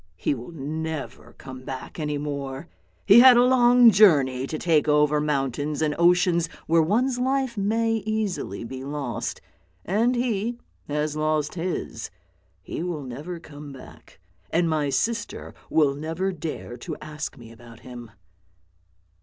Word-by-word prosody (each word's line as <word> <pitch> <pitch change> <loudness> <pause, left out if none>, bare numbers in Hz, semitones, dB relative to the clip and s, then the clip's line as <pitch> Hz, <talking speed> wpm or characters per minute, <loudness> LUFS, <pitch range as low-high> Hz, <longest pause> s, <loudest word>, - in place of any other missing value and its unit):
" - - -45
He - - +3
will 125 -2 -8
never 160 0 -6
come 130 -1 -10
back 130 +5 -7
any 150 -1 -2
more. 140 0 -5 0.4
He 210 +3 +8
had 250 0 +9
a 240 - +6
long 245 -2 +6
journey 140 -11 +4
to 155 - -4
take 160 -2 +2
over 150 0 +3
mountains 145 0 -1
and 155 -1 +1
oceans 175 -1 +3 0.2
where 165 +1 +4
one's 245 +9 +1
life 260 -1 0
may 225 +2 +1
easily 215 - -3
be 130 +3 -7
lost, 140 -5 -4 0.4
and 230 +7 +1
he 235 -1 -1 0.3
has 150 +1 -2
lost 155 -1 0
his. 180 +1 -4 0.5
He - - -5
will 170 -4 -4
never 145 +8 -7
come 145 -2 -11
back, 135 - -14 0.3
and 170 +1 +1
my 155 -3 0
sister 210 - -2 0.2
will 150 -3 +3
never 165 +6 -3
dare 155 -7 -6
to 120 - -6
ask 150 -1 -6
me 115 -2 -13
about 115 0 -15
him." 120 -2 -10
155 Hz, 145 wpm, -24 LUFS, 140-200 Hz, 0.5 s, had